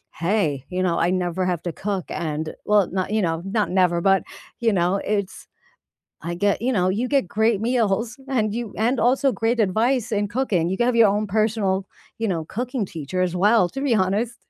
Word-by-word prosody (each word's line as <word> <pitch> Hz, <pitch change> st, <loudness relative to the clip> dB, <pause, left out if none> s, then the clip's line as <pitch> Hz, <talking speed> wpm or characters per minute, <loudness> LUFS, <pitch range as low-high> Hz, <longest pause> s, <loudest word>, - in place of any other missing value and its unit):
"Hey, 165 Hz, -6 st, 0 dB
you 185 Hz, 0 st, -2 dB
know, 175 Hz, -2 st, +1 dB
I 170 Hz, -, +2 dB
never 180 Hz, 0 st, -1 dB
have 175 Hz, -3 st, -1 dB
to 175 Hz, -2 st, -3 dB
cook, 195 Hz, -3 st, -3 dB
and" 155 Hz, -1 st, -4 dB
well, 205 Hz, -2 st, +3 dB
not 190 Hz, +2 st, -2 dB
you 215 Hz, 0 st, +1 dB
know, 165 Hz, -2 st, -1 dB
not 205 Hz, +1 st, 0 dB
never, 180 Hz, -2 st, +2 dB
but, 195 Hz, 0 st, +3 dB, 0.4 s
you 230 Hz, -2 st, +3 dB
know, 180 Hz, +1 st, +2 dB
it's 200 Hz, -2 st, -3 dB, 0.8 s
I 170 Hz, +1 st, -3 dB
get 205 Hz, +4 st, +1 dB
you 255 Hz, -, +1 dB
know, 185 Hz, -5 st, +2 dB
you 220 Hz, +7 st, -1 dB
get 275 Hz, -8 st, +2 dB
great 220 Hz, +1 st, +1 dB
meals, 225 Hz, -1 st, 0 dB
and 220 Hz, -5 st, 0 dB
you 235 Hz, -3 st, -4 dB
and 235 Hz, +3 st, +1 dB
also 265 Hz, +2 st, +3 dB
great 225 Hz, +4 st, 0 dB
advice 230 Hz, +4 st, +1 dB
in 205 Hz, 0 st, 0 dB
cooking. 205 Hz, -8 st, 0 dB
You 190 Hz, -, -1 dB
can 240 Hz, -, +1 dB
have 250 Hz, -, +2 dB
your 225 Hz, -2 st, +6 dB
own 210 Hz, +2 st, 0 dB
personal, 205 Hz, -2 st, 0 dB, 0.3 s
you 225 Hz, -, -1 dB
know, 165 Hz, -4 st, -2 dB
cooking 245 Hz, -, -3 dB
teacher 165 Hz, +2 st, -3 dB
as 180 Hz, -1 st, -1 dB
well, 200 Hz, 0 st, +4 dB
to 270 Hz, -, -5 dB
be 275 Hz, -3 st, 0 dB
honest. 210 Hz, +4 st, 0 dB
205 Hz, 205 wpm, -23 LUFS, 180-230 Hz, 0.8 s, your